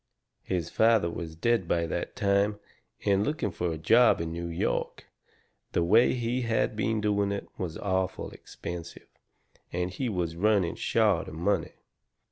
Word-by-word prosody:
His 85 -3 -3
father 110 -6 +3
was 80 -2 -6
dead 110 +2 +1
by 85 0 +1
that 80 - -4
time, 100 +1 +1 0.5
and 100 0 +3
looking 130 -5 -1
fur 85 -1 -2
a - - -5
job 115 +10 +5
in 80 -1 -3
New 85 +1 -4
York, 85 0 -2 0.7
the 85 - +2
way 110 +10 +5
he 120 +1 -1
had 115 -2 0
been 110 +1 0
doing 100 -1 +1
it, 100 - -4
was 85 -3 -3
awful 95 -2 -2
expensive, 85 -1 -8 0.7
and 90 +1 -2
he 120 +7 -2
was 85 -5 -2
running 100 -1 +2
short 105 -6 +1
of - - -8
money. 95 +5 0
100 Hz, 155 wpm, -28 LUFS, 85-110 Hz, 0.7 s, job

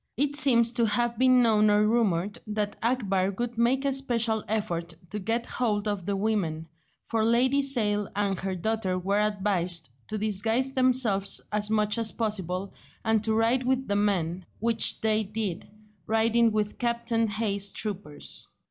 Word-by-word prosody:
It 285 +2 +1
seems 240 -5 +4
to 235 -1 +1
have 235 +2 0
been 255 -1 +5
known 215 -2 +4
or 210 0 +4
rumoured 205 -4 0
that 210 -1 -2
Akbar 200 -6 0
would 240 0 -3
make 250 +4 +1
a 275 - +1
special 235 -5 0
effort 170 -6 -2 0.2
to 210 - -3
get 230 +4 -1
hold 215 -5 -1
of 205 -3 -3
the 200 - 0
women, 195 -7 -1 0.4
for 225 -1 -1
Lady 250 +5 +3
Sale 210 -7 +1
and 200 -2 -1
her 190 -1 -3
daughter 190 -1 -1
were 195 +3 0
advised 190 - 0 0.2
to 215 - -3
disguise 220 +5 0
themselves 250 -7 +2
as 210 0 0
much 215 0 +1
as 225 -1 0
possible, 195 -4 -3 0.3
and 220 -1 +2
to 220 0 0
ride 230 +3 +2
with 260 +1 -1
the 200 - 0
men, 185 -4 0 0.2
which 230 0 +1
they 220 0 +3
did, 205 -4 -3 0.4
riding 225 +1 +3
with 210 -1 -2
Captain 235 -1 0
Hay's 200 -2 0
troopers. 190 -9 -4
215 Hz, 160 wpm, -27 LUFS, 200-235 Hz, 0.4 s, been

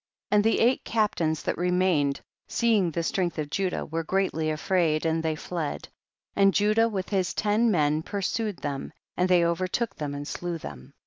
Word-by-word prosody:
46. - - +4
And 205 - +5
the 225 +1 +3
eight 250 +3 +2
captains 175 -8 0
that - - -2
remained, 180 -6 +1 0.3
seeing 220 -6 +2
the 165 +1 -2
strength 175 0 -1
of 150 -2 -3
Ju 195 +1 0
dah, - - -3
were 165 +1 -3
greatly 160 -3 0
afraid 155 0 +1
and 160 0 +1
they 160 -1 -1
fled, 160 -1 -4 0.5
and 195 -1 +4
Judah 215 +2 +3
with 190 -4 -4
his 190 -3 0
ten 215 +3 +2
men 155 -5 +2
pur 200 +4 -4
sued 210 0 -1
them, 140 -2 -5 0.2
and 180 +1 +1
they 175 -2 +5
overtook 185 +6 -1
them 145 -2 -4
and 145 0 -6
slew 175 0 -4
them. 65 - -10
180 Hz, 190 wpm, -26 LUFS, 155-200 Hz, 0.5 s, And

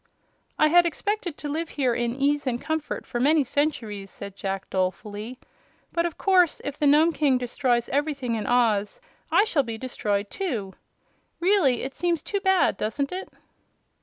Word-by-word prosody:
"I 305 - +4
had 345 +2 +6
expected 375 -1 -3
to 295 - -5
live 315 +3 -2
here 255 -4 +2
in 235 0 -1
ease 285 +1 +1
and 240 -1 0
comfort 315 +1 -3
for 240 - -4
many 295 +4 +4
centuries," 230 -8 -2
said 200 +1 -9
Jack, 195 -1 -4
dolefully; 205 +5 -3 0.5
"but 340 0 +1
of 335 - -8
course 365 -4 +3
if 285 - -4
the 295 - +1
Nome 310 +4 +5
King 285 -4 +2
destroys 245 -1 0
everything 280 -3 -1
in 220 -2 -2
Oz 230 - +2 0.3
I - - +5
shall 360 -10 +2
be 230 -4 -5
destroyed 210 -4 -2
too. 230 - -3 0.7
Really, 345 - +3
it 270 - -4
seems 340 -1 -1
too 400 - -2
bad, 380 - +3
doesn't 250 +7 -2
it?" 370 +1 -5
275 Hz, 165 wpm, -25 LUFS, 230-320 Hz, 0.7 s, had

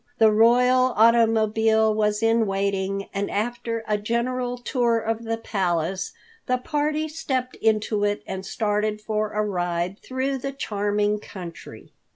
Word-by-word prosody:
The 220 -1 +6
royal 250 +3 +4
automobile 220 -1 +4
was 210 0 0
in 225 -1 +3
waiting, 195 0 -1
and 200 0 -2
after 230 +1 -2
a 210 -1 +1
general 245 +3 -1
tour 240 -2 +1
of 225 +1 -3
the 225 0 -1
Palace 185 -3 -1 0.4
the 255 - +2
party 300 +3 -1
stepped 260 -5 -3
into 215 -1 +1
it 205 0 0
and 190 0 -5
started 210 +1 -1
for 215 0 -2
a 210 0 0
ride 175 -1 -2
through 265 +1 -2
the 275 +2 -4
charming 205 -3 -1
country. 180 -5 -10
220 Hz, 140 wpm, -24 LUFS, 205-240 Hz, 0.4 s, The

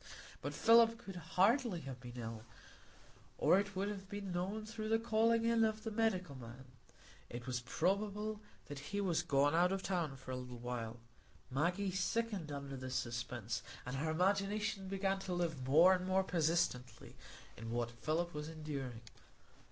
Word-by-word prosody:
But - - -4
Philip 230 0 +6
could 195 -5 -9
hardly 190 - +2
have 135 -2 -7
been 125 -1 -9
ill, 115 -2 -5 0.9
or 190 - +5
it 200 -1 -3
would 195 +2 0
have 195 -2 -5
been 205 -2 -5
known 190 +5 -2
through 215 0 -5
the 225 - +4
calling 230 0 +3
in 230 -1 +4
of 220 -1 0
the 225 - -3
medical 200 -8 +1
man; 125 0 -10 0.6
it 120 0 -6
was 125 -1 -2
probable 205 - -1 0.2
that 145 -1 -7
he 200 +9 -4
was 175 -4 +2
gone 145 -3 +3
out 175 +2 +4
of 195 0 -1
the - - -3
town 170 -7 0
for 130 -1 -8
a - - -1
little 125 -1 -6
while. 120 -1 -4 0.5
Maggie 180 +8 +1
sickened 190 -3 -1
under 140 -1 -5
this 130 0 -5
suspense, 120 -1 -2 0.2
and 125 +2 -3
her 155 +4 -1
imagination 195 +4 +1
began 195 0 0
to 185 -2 -3
live 160 -7 -2
more 165 +7 +7
and 185 0 -1
more 190 0 +3
persistently 160 -7 0 0.4
in 115 +1 -7
what 120 0 -1
Philip 155 +9 -1
was 150 +1 -4
enduring. 140 -7 -5
175 Hz, 170 wpm, -37 LUFS, 130-200 Hz, 0.9 s, more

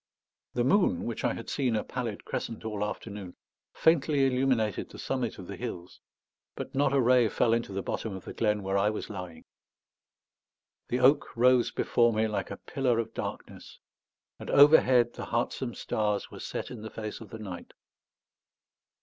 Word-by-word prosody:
The 120 - +2
moon, 190 +9 +3
which 115 -1 -4
I - - +2
had 115 - -8
seen 130 -5 0
a 105 - 0
pallid 120 -5 -5
crescent 115 -1 -4
all 105 -2 -2
afternoon, 105 -3 -6 0.4
faintly 150 -3 +3
illuminated 125 -5 +1
the - - -12
summit 130 -4 -2
of 95 - -9
the 100 - -7
hills, 90 -8 -7 0.6
but - - -6
not 135 0 +2
a 140 - +3
ray 125 -2 +4
fell 115 +3 +2
into 115 -3 -1
the 95 0 -3
bottom 110 -4 -3
of 95 - -9
the - - -7
glen 105 -2 0
where 95 +1 +1
I 100 +2 +3
was 110 0 -5
lying. 90 -4 -8 1.4
The 125 +1 -1
oak 135 -1 +3
rose 125 0 +5
before 120 -1 +2
me 110 +1 +1
like 105 - -3
a - - -6
pillar 130 -4 0
of 115 -1 -2
darkness; - - -7 0.6
and - - -8
overhead 130 -5 +6
the - - -6
heartsome 120 +1 -2
stars 105 -1 -1
were - - -9
set - - -5
in - - -7
the 110 - -6
face 110 -1 -6
of 115 - -10
the 110 - -7
night. 95 -5 -8
115 Hz, 175 wpm, -29 LUFS, 105-125 Hz, 1.4 s, overhead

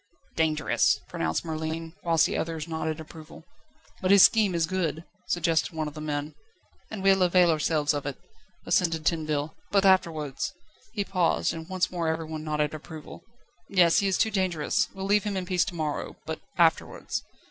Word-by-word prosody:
"Dangerous," 155 -2 +2
pronounced 80 - -2
Merlin, 160 0 -4
whilst 165 -2 +3
the - - -2
others 160 -1 -3
nodded 160 -1 -3
approval. 160 0 -11 0.6
"But 185 - 0
his 200 -1 +8
scheme 210 -5 +5
is 165 -1 +2
good," 165 -3 -2 0.2
suggested 165 0 +1
one 155 -1 -2
of 150 - -7
the 155 - -8
men. 150 0 -3 0.6
"And 205 -3 -6
we'll 195 -1 +4
avail 180 -1 +5
ourselves 155 -1 +1
of 145 -1 -3
it," 140 - -4 0.5
assented 165 -3 +1
Tinville, 155 -2 0 0.2
"but 200 -1 +3
afterwards 160 -7 +1 0.2
..." - - -30
He 205 - 0
paused, 180 -4 +1
and 160 0 -8
once 185 -1 0
more 170 -2 -2
everyone 160 -1 -3
nodded 150 -1 -1
approval. 155 0 -9 0.5
"Yes; 175 -1 +5
he 200 - +1
is 190 - +1
dangerous. 185 -8 +1
We'll 195 0 -5
leave 205 +1 +3
him 205 -2 -2
in 185 - -3
peace 180 -2 +1
to 175 - -6
morrow, 155 -3 -3
but - - -4 0.2
afterwards - - +1
165 Hz, 170 wpm, -27 LUFS, 155-185 Hz, 0.6 s, his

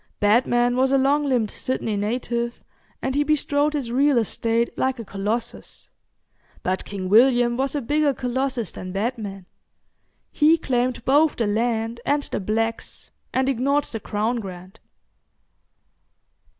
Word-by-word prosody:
Batman 240 +3 +3
was 260 +1 +2
a 275 - +4
long 280 +3 +2
limbed 245 -6 +1
Sydney 230 -4 -2
native, 235 +3 -2 0.4
and 265 - -1
he 290 +2 +2
bestrode 295 0 +1
his 270 -6 -3
real 275 +2 +3
estate 230 +1 0
like 260 0 0
a 230 - -7
Colossus, 215 +5 -4 0.7
but 185 +1 -1
King 195 -2 -5
William 240 +3 +5
was 270 +3 -1
a 290 - 0
bigger 295 +3 +2
Colossus 255 -3 -2
than 185 0 -7
Batman 200 -3 -3 0.9
he 315 +2 +4
claimed 250 -4 -1
both 295 +3 +4
the 230 - 0
land 225 +2 -1
and 290 0 +1
the - - -3
blacks, 225 +3 -3 0.2
and 260 0 +1
ignored 275 +3 +1
the 225 - -6
Crown 215 +4 -1
grant. 185 -3 -8
240 Hz, 135 wpm, -23 LUFS, 220-270 Hz, 0.9 s, William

